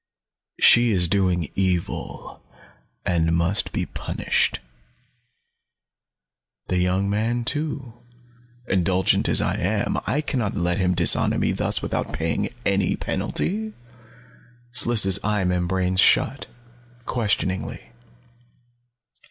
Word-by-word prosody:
She 120 0 +6
is 90 -5 +2
doing 90 -4 0
evil, 90 -3 -3 0.6
and 85 -1 +1
must 85 +4 0
be - - -2
punished. - - -1 2.1
The 90 - 0
young 90 +2 0
man, 115 +4 -1
too 145 -4 -3 0.7
indulgent 95 0 +1
as - - +4
I - - -1
am, 100 +3 -1
I 150 - 0
can 140 -3 -3
not 105 -3 -2
let 90 0 0
him 90 -1 +1
dishonor 85 -1 +3
me - - 0
thus - - +2
without - - -3
paying 80 +1 -2 0.2
any 100 -2 +1
penalty." 215 +3 -2 1.0
Sliss' 110 -6 +4
eye 105 -1 0
membranes 90 +1 -1
shut, - - +3 0.6
questioningly. 105 -6 -2
95 Hz, 105 wpm, -23 LUFS, 90-110 Hz, 2.1 s, She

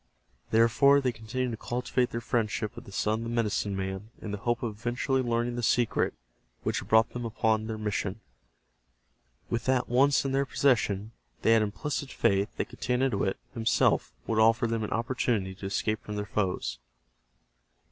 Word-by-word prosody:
Therefore, 115 +5 +5
they 130 -2 +1
continued 120 +3 -3
to 110 - -4
cultivate 125 +1 -1
their 115 - -4
friendship 110 -2 -1
with - - -10
the - - -11
son 105 +3 0
of - - -5
the - - -4
medicine 105 -3 0
man 95 +2 -4
in 105 - -6
the 105 - -4
hope 120 +3 -1
of 110 -3 -2
eventually 125 +3 0
learning 120 0 -1
the - - -1
secret 120 0 +1 0.5
which - - 0
had - - -9
brought 110 +1 +4
them 120 - -5
upon 110 -1 0
their 110 -1 -3
mission. 105 -1 -2 1.3
With 115 0 -1
that 130 -1 +2
once 135 +3 +3
in 135 - 0
their 135 +1 +1
possession, 110 -7 +1 0.3
they - - +4
had 115 -1 +6
implicit 135 +7 -3
faith 100 +2 +2
that - - -2
Getanittowit 125 -6 0 0.2
himself 115 -1 +2
would 110 - 0
offer 115 +2 +4
them 115 -1 -1
an 105 - -3
opportunity 115 -4 0
to 95 +1 -6
escape 105 +2 -1
from 105 - -6
their 105 0 -2
foes. 95 -2 -2
115 Hz, 175 wpm, -28 LUFS, 105-125 Hz, 1.3 s, had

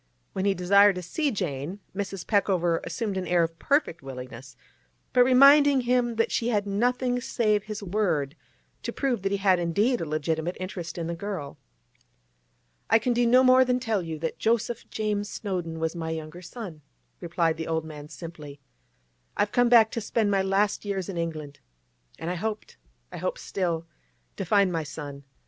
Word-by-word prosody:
When 190 - -2
he 200 -1 +2
desired 200 +2 +5
to 180 - -5
see 295 - -1
Jane, 165 - -3 0.2
Mrs. 195 -1 -4
Peckover 180 -5 +2
assumed 210 -5 -3
an 185 - -3
air 175 -1 +3
of 165 0 -4
perfect 285 - +1
willingness, 130 -1 -9 0.6
but 250 - +6
reminded 275 +1 +6
him 240 -1 +1
that 225 - +1
she 235 - 0
had 205 -3 +1
nothing 245 +4 0
save 215 -4 +1
his 215 -1 -6
word 175 -8 0 0.5
to - - -4
prove 260 -7 -1
that 195 0 -1
he 200 - +1
had 190 -2 +3
indeed 205 +9 +1
a - - -2
legitimate 160 +3 -2
interest 180 -3 -6
in 170 - -3
the 170 - -3
girl. 165 -6 -6 1.3
'I - - +6
can 240 +2 0
do 240 0 +2
no 250 +2 +6
more 255 0 +7
than 250 0 +1
tell 225 -5 0
you 165 -2 -5
that 160 +1 -4
Joseph 230 +1 0
James 210 -1 -2
Snowdon 180 -5 -4
was 160 +1 -1
my 165 -1 -4
younger 160 +2 -6
son,' 180 -4 -8 0.4
replied 170 -2 0
the 160 - -4
old 160 -1 -1
man 150 -1 -9
simply. 155 -5 -9 0.8
'I've 205 0 +1
come 245 -1 +3
back 225 -2 +6
to 230 - -3
spend 215 -1 0
my 195 -1 +3
last 195 +2 +1
years 195 -3 -3
in 190 - -5
England, 155 -4 -4 0.6
and 170 - -4
I - - -2
hoped—I - - -7
hope - - -2
still—to 170 +1 -5
find 200 0 +3
my 165 -2 -1
son. 145 -2 -8
190 Hz, 175 wpm, -26 LUFS, 165-220 Hz, 1.3 s, more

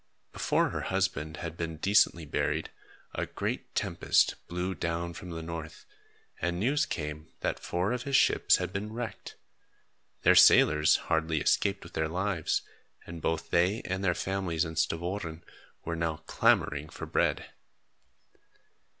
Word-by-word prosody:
Before - - +1
her - - -3
husband 90 -5 -1
had 85 -1 -5
been 80 -1 -4
decently 85 -2 +3
buried, 75 - -1 0.4
a - - -2
great - - -4
tempest - - +2
blew 90 +2 -2
down 85 -1 -3
from 90 +1 -9
the 80 -1 -5
north, 80 -1 -7 0.6
and 85 +1 -1
news 140 +8 +1
came 75 0 -5
that - - -1
four 90 +4 -1
of 125 0 -1
his 140 +1 -1
ships - - +5
had - - -3
been 105 +2 -3
wrecked. 115 -2 -6 0.9
Their - - +7
sailors 75 0 +6
hardly 80 0 0
escaped 100 +6 +1
with 85 - -13
their 80 0 -1
lives, 90 -1 -1 0.4
and 85 -1 -8
both 80 +1 -2
they 90 +6 +2
and 95 +1 -3
their 90 -2 +2
families 95 -4 -1
in 80 0 -6
Stavoren 85 +1 -2 0.4
were 85 - -2
now 80 -1 -2
clamoring 75 +1 +2
for - - -7
bread. - - 0
85 Hz, 145 wpm, -29 LUFS, 80-95 Hz, 0.9 s, Their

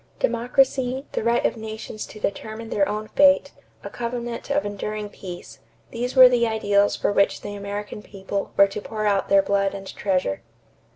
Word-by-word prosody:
Democracy, 260 - +1
the - - -2
right 235 +1 +2
of - - +1
nations 220 -1 -7
to 215 - -12
determine 220 +2 -4
their 200 -1 +1
own 215 +1 -3
fate, 280 0 +4 0.3
a - - -6
covenant 240 0 -5
of 290 +1 +1
enduring 210 +1 -4
peace 175 - -10 0.3
these 245 +3 -3
were 260 -1 +10
the 240 -2 +2
ideals 205 -2 +2
for - - 0
which 200 -1 +2
the 205 - -6
American 205 +1 -6
people 200 -1 -5
were 200 - +8
to 200 +1 -6
pour 215 0 -4
out 200 -2 +1
their 195 0 +5
blood 200 0 0
and 195 -1 -8
treasure. 185 - -1
215 Hz, 175 wpm, -23 LUFS, 200-235 Hz, 0.3 s, were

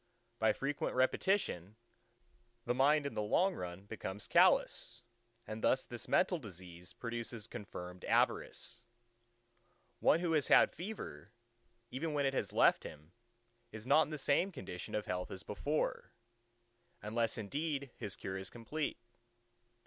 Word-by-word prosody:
By - - +4
frequent 140 +1 -2
repetition, 130 - +1 0.9
the - - +1
mind 140 +3 +4
in 140 - -3
the - - -1
long 180 - +3
run 90 - -6
becomes 100 -2 -6
callous; - - +3 0.4
and 110 +1 -6
thus 130 - +3
this 120 -1 -7
mental 180 -2 +3
disease 90 - -11
produces 115 -2 -5
confirmed 90 -5 -8
Avarice. 120 - 0 1.2
One - - +5
who 175 -2 0
has 150 -3 +2
had - - +7
fever, 135 - -7 0.6
even 150 +4 -2
when 140 -1 +2
it 135 - +1
has - - -1
left - - +4
him, 75 +2 -10 0.6
is 110 0 -8
not 140 +4 +6
in 155 - 0
the 155 - -4
same 145 +7 +2
condition 90 - -6
of 105 - -1
health 90 0 -3
as 95 - -7
before, 145 +9 -2 0.9
unless 115 +2 0
indeed 140 +5 -3
his 100 - -5
cure 95 0 -4
is 95 0 -7
complete. 140 +6 -3
115 Hz, 140 wpm, -35 LUFS, 95-145 Hz, 1.2 s, had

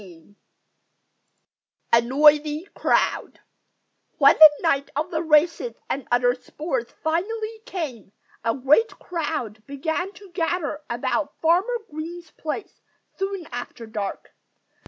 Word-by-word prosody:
XVI 180 0 -16 1.6
A 235 - +7
NOISY 295 +6 +3
CROWD - - 0 0.8
When 280 +1 +7
the 310 -1 +10
night 280 -4 +1
of 300 +2 -2
the 320 -2 -1
races 330 +8 +2 0.2
and 275 - -3
other 245 0 +4
sports 260 -1 -4
finally 435 +8 -2
came, 280 - -5 0.3
a 230 - +1
great 295 - +3
crowd 295 - -4
began 320 +7 -2
to 400 -3 -15
gather 330 -3 -2
about 285 +5 -2
Farmer 365 +9 +2
Green's 330 +2 -7
place 320 +6 -6 0.4
soon 390 -2 -3
after 240 -1 -7
dark. 210 -3 -5
305 Hz, 115 wpm, -24 LUFS, 250-345 Hz, 1.6 s, the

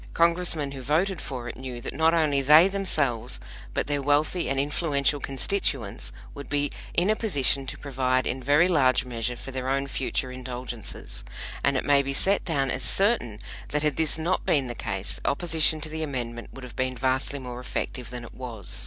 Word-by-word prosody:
Congressmen 170 -4 +3
who 135 -1 -7
voted 165 +6 +1
for 125 -3 -5
it 115 - -6
knew 130 -2 -6
that - - -5
not 160 +3 +3
only 155 -4 +2
they 155 +6 +8
themselves, 140 - 0 0.4
but - - +1
their 145 0 -1
wealthy 150 +5 +1
and 135 0 0
influential 145 0 +1
constituents, 135 - -2 0.2
would 140 - -9
be 145 -1 0 0.2
in 180 +5 +3
a - - +2
position 140 - +2
to - - -5
provide 130 -2 0
in 130 +2 -1
very 145 +7 +4
large 130 -8 +3
measure 120 0 -3
for 125 +3 -8
their 130 0 -3
own 135 +1 +1
future 135 -1 -2
indulgences; 125 - -6 0.4
and 140 -1 +3
it - - -2
may 145 -1 +5
be 135 0 -3
set 195 +7 +2
down 140 -6 0
as 130 - -2
certain 190 - +2 0.3
that 150 +1 0
had 150 -3 +1
this 160 -1 +1
not 170 +4 0
been 140 -3 +2
the 120 - -4
case, 95 -4 -4
opposition 160 0 +3
to 155 - -3
the 160 +1 -5
Amendment 120 -6 -4
would 135 - -11
have 125 - -9
been 130 0 -1
vastly 130 +3 0
more 125 -2 -7
effective 125 0 -4
than 125 0 -7
it 120 - -11
was. 115 -6 -5
140 Hz, 195 wpm, -26 LUFS, 125-155 Hz, 0.4 s, they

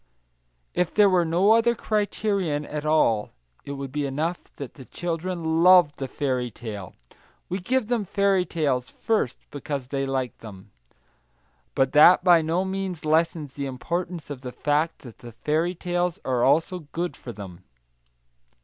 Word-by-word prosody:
If 180 -2 0
there 205 -2 +5
were 180 -2 +3
no 175 +6 +3
other 230 +1 +4
criterion 200 -8 -1
at 150 +1 -5
all, 115 -9 +2 0.3
it 140 - -5
would 135 -1 -6
be 145 0 -1
enough 155 +6 -3
that 140 -3 -7
the 130 - -12
children 165 0 -2
love 175 -4 +6
the 135 - -4
fairy 130 -3 -2
tale; 105 -5 -8 0.5
we 185 - -2
give 255 +6 0
them 230 -2 -1
fairy 195 -1 +2
stories, 140 -7 0
first, 215 - -1
because 140 -3 -5
they 135 -1 -2
like 130 -2 -2
them. 100 -2 -12 1.0
But 135 -1 +2
that 170 +5 +7
by 175 -3 +6
no 165 +4 0
means 190 -4 -4
lessens 155 -2 +1
the 140 -1 -4
importance 170 +4 -4
of 135 -3 -6
the 125 -2 -6
fact 150 +5 -1
that 120 -4 -13
fairy 160 +7 0
tales 175 +1 -1
are 125 -2 +1
also 160 +3 +1
good 175 +1 -2
for 120 - -9
them. 95 -5 -10
160 Hz, 155 wpm, -25 LUFS, 135-180 Hz, 1.0 s, that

